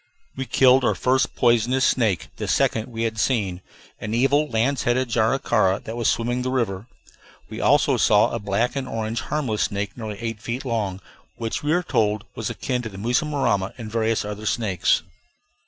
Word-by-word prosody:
We 130 - -3
killed 130 +2 +5
our - - +2
first 130 +1 +1
poisonous 120 +2 +3
snake 110 -9 +1
(the - - -4
second 110 -1 +1
we 115 -2 -4
had 110 -1 -2
seen), 100 -8 0 0.4
an 110 +2 -3
evil 140 +5 +3
lance 125 +5 +1
headed 125 +1 +1
jararaca 110 -4 +2
that 115 - -6
was 120 -2 +1
swimming 120 +2 0
the 130 - -2
river. 115 -5 -2 0.6
We - - -5
also - - +3
saw - - +4
a - - -2
black 100 +6 -1
and 135 -2 -3
orange 115 -1 -3
harmless 130 -9 -2
snake, 100 0 -2
nearly 110 -4 -6
eight 115 -1 -5
feet 120 +5 -4
long, 105 -6 -2 0.3
which 115 -1 -3
we 150 - -1
were 175 +2 +2
told 105 -6 0
was 110 - -4
akin 125 -2 -2
to 115 - -6
the 95 - -11
mussurama; 120 -3 0
and 110 -3 -7
various 115 -1 0
other 105 +1 -5
snakes. 100 -10 +1
115 Hz, 180 wpm, -23 LUFS, 105-125 Hz, 0.6 s, killed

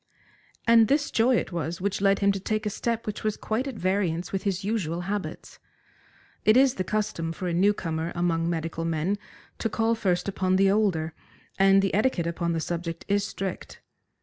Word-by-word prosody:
And 230 -1 +6
this 285 +3 +1
joy 245 +3 +3
it 210 - -1
was 170 +1 -3
which 195 +1 -2
led 195 0 +4
him 200 - +6
to 195 - -3
take 215 +3 -2
a 210 - -1
step 230 +2 -2
which 210 - -5
was 215 -1 -1
quite 230 +5 -2
at 265 - -5
variance 185 -3 -1
with 195 - -1
his 195 -1 -2
usual 185 -6 -1
habits. 195 +2 -5 0.8
It 215 +3 +5
is 265 -1 +5
the 185 - -2
custom 180 -5 -2
for 180 +3 -5
a 175 - -1
new 190 +4 +4
comer 165 -4 -3
among 170 -1 0
medical 165 -1 -3
men 165 +5 -1 0.4
to 225 - 0
call 225 +2 +1
first 185 -6 0
upon 185 -1 +1
the 195 0 +4
older, 180 -7 +1 0.5
and 195 0 +5
the 195 - 0
etiquette 210 -5 +1
upon 170 0 -1
the 165 - -1
subject 165 0 -4
is 200 0 +2
strict. 195 -2 -5
195 Hz, 195 wpm, -26 LUFS, 170-215 Hz, 0.8 s, And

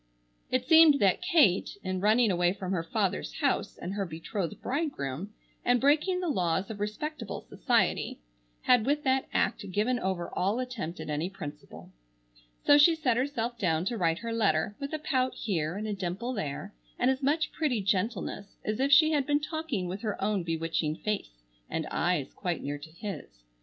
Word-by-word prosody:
It 255 0 0
seemed 320 -2 +7
that 195 - +3
Kate, 290 - +3
in 185 -1 -2
running 215 +2 +4
away 175 0 +2
from 190 -2 -5
her 180 -3 0
father's 110 - -2
house - - 0
and 180 - -5
her 200 -1 -1
betrothed 170 +1 -4
bridegroom, 205 - -3 0.3
and 245 0 +3
breaking 305 +7 +3
the 360 - -2
laws 185 - 0
of 210 - -7
respectable 225 +5 -4
society, - - +1 0.5
had 245 -2 +4
with 295 +1 +1
that 265 0 +1
act 200 - 0
given 230 +6 +1
over 185 -4 -3
all 195 +5 0
attempt 240 -9 -4
at - - -5
any 155 +4 -1
principle. 150 -7 -9 0.7
So 290 0 +7
she 325 +3 +7
set 265 -7 +1
herself 240 -2 -2
down 165 -2 +1
to 235 +4 -1
write 165 -2 +2
her 230 +3 -4
letter, 205 -3 +1
with 280 0 -4
a 310 - -1
pout 260 -4 0
here 170 -5 -2
and 215 +2 -4
a 210 - -1
dimple 195 +6 -3
there, 150 - -4 0.2
and 260 - +3
as 265 +1 -2
much 300 +4 +1
pretty 285 -8 0
gentleness 200 +1 -2
as 215 +2 -1
if 275 +1 +1
she 310 +2 +7
had 285 -4 +1
been 290 0 +3
talking 300 - -3
with 190 +3 -5
her 215 -3 -3
own 200 -1 0
bewitching 165 -2 -1
face 160 - -4 0.3
and - - -2
eyes - - 0
quite - - -3
near 145 +1 -3
to 150 +2 -11
his. 155 - -8
210 Hz, 185 wpm, -29 LUFS, 175-265 Hz, 0.7 s, seemed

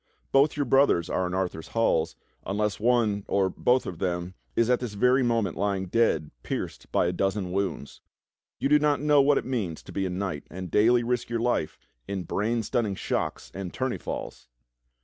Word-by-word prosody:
Both 140 +2 +4
your 145 - +1
brothers 130 -10 +3
are 90 -1 0
in 90 - -3
Arthur's 90 -4 -2
halls, 80 -8 +2 0.3
unless 105 +1 -1
one, 110 -3 +2
or 95 -1 +1
both, 125 +6 +2
of 90 - -6
them 90 -1 -2 0.2
is 115 - +3
at 125 0 +3
this 120 -5 -5
very 125 +5 +4
moment 115 -4 +1
lying 100 -1 0
dead 90 -7 +1
pierced - - -5
by - - +2
a 85 - +1
dozen 95 0 -1
wounds. 95 -6 -3 0.6
You - - 0
do 150 +1 +5
not 150 -1 +2
know 145 -1 +4
wdiat 145 +1 +4
it - - -1
means 105 -11 -3
to - - -11
be 95 -1 -1
a - - -3
knight 90 -5 -4
and 90 0 -7
daily 120 +3 +4
risk 120 0 -1
your 120 -1 -1
life 115 -9 0 0.3
in 95 -2 -3
brain 110 +5 -1
stunning 110 -2 -1
shocks - - -3
and 95 -1 -5
tourney 130 -1 -2
falls." - - -6
105 Hz, 190 wpm, -27 LUFS, 95-125 Hz, 0.6 s, do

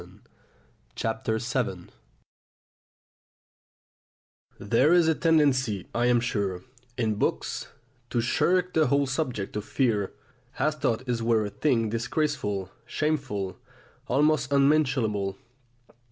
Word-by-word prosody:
VII - - -12 1.2
FEARS 115 +3 -2
OF 130 -2 +3
BOYHOOD 90 -2 -9 2.7
There 120 - +3
is 175 -2 +5
a 160 - +4
tendency, 135 - +2
I 120 +1 +1
am 120 -1 +4
sure, 100 -6 -2 0.3
in 110 -3 +1
books, - - -1 0.4
to 120 - 0
shirk 175 +9 +1
the 155 -1 +3
whole 140 0 +2
subject 130 -8 -3
of 105 - -2
fear, 110 -6 0 0.5
as 155 0 0
though 120 - +1
it 120 -2 -1
were 115 -2 +2
a 105 - -5
thing 115 -1 +1
disgraceful, 115 - -2 0.2
shameful, 135 -12 -2 0.5
almost 145 -2 +2
unmentionable. 130 -9 +2
125 Hz, 110 wpm, -27 LUFS, 105-150 Hz, 2.7 s, is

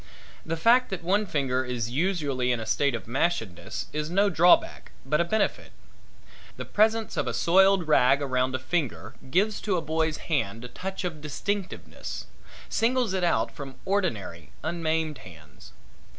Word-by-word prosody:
The 165 0 -3
fact 240 +8 +4
that 190 -3 -5
one 200 +4 +1
finger 130 -5 0
is 120 -2 -3
usually 140 -5 0
in 120 - 0
a 110 - -5
state 140 +3 +1
of 115 - -7
mashedness 110 - -2
is 150 +1 -2
no 200 +3 +2
drawback, 175 +2 +3
but 150 +4 +2
a - - +3
benefit. 215 +6 -1 0.9
The - - -5
presence 220 +1 +1
of - - 0
a - - -2
soiled 190 0 +4
rag 135 -2 +5
around 130 -2 0
a - - +1
finger 140 +1 -3 0.2
gives 200 +8 +1
to 195 -4 0
a - - -1
boy's 160 0 0
hand 115 -7 -2
a - - -8
touch 190 +8 -5
of 165 -4 -4
distinctiveness 190 +6 -4 0.4
singles 235 -2 +1
it 190 -1 -1
out 115 -10 +1
from 135 -2 -9
ordinary 135 - -2
unmaimed 160 -2 -1
hands. 80 -6 -14
160 Hz, 160 wpm, -27 LUFS, 130-190 Hz, 0.9 s, rag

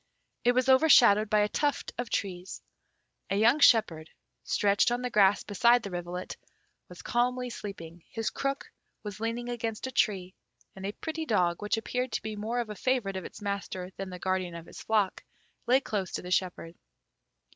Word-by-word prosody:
It 245 - +4
was 255 +1 +1
overshadowed 245 -7 +6
by 210 -1 +4
a 210 - +3
tuft 290 +5 -1
of 245 - -3
trees. 185 -2 -3 0.7
A 195 - 0
young 235 +7 +4
shepherd, 195 - +4 0.3
stretched 200 +1 +2
on 245 +1 -2
the 250 - -2
grass 200 -2 +4
beside 235 +4 +3
the 200 - -6
rivulet, 175 +1 -5 0.5
was 180 0 -11
calmly 250 +1 0
sleeping; 170 -6 -8
his 225 -1 -3
crook 275 0 -3 0.3
was 210 -1 -7
leaning 230 +2 -3
against 230 -2 -3
a 260 - -4
tree, 190 -6 0 0.4
and 190 0 -5
a - - -2
pretty 320 +7 -5
dog, 180 -6 +1
which 210 +2 0
appeared 250 +2 -2
to - - -1
be 215 0 -4
more 220 +4 -2
a 215 -3 -6
favourite 240 -5 0
of 190 - -5
its 205 - -10
master 195 -2 -4
than 195 -1 -6
the 180 - -7
guardian 185 -1 -2
of 170 -1 -8
his - - -11
flock, 210 -4 0 0.4
lay 255 +2 +5
close 200 -8 -3
to - - -3
the 180 - -7
shepherd. 180 -3 -1
210 Hz, 180 wpm, -29 LUFS, 185-240 Hz, 0.7 s, overshadowed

